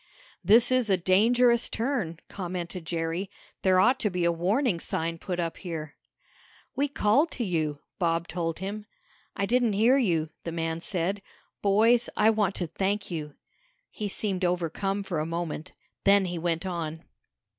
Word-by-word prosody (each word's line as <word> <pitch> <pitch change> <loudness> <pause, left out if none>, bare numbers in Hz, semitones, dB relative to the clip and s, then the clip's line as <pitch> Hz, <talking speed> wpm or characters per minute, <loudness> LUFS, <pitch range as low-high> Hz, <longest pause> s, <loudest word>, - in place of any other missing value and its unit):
"This 225 +7 +6
is 255 -4 +2
a 190 - +4
dangerous 235 +7 +3
turn," 225 - -2
commented 180 -2 -5
Jerry. 170 +3 -2 0.3
"There 185 -1 +4
ought 250 +7 +4
to 210 - 0
be 180 -2 -1
a 170 - +4
warning 190 - +1
sign 165 0 -2
put 180 0 -4
up 165 -1 -2
here." 160 -4 -6 0.8
"We 280 +2 +1
called 280 +4 +2
to 245 - -2
you," 155 -7 -1 0.2
Bob 170 -1 0
told 165 -2 -3
him. 205 +3 -6 0.5
"I 200 - 0
didn't 240 0 +2
hear 235 +7 +4
you," 165 - 0
the 165 - -4
man 165 0 -2
said. 190 +3 -1 0.4
"Boys, 225 +4 +4
I 220 +1 +5
want 210 -3 0
to 180 - -1
thank 195 +5 -2
you!" 150 -3 -5 0.6
He 210 - -4
seemed 195 -2 -1
overcome 180 +3 -1
for 180 -5 -3
a 155 - -1
moment. 165 -2 -4 0.3
Then 200 0 +5
he 175 -2 -3
went 165 +1 -1
on. 165 -3 -4
185 Hz, 160 wpm, -27 LUFS, 165-210 Hz, 0.8 s, This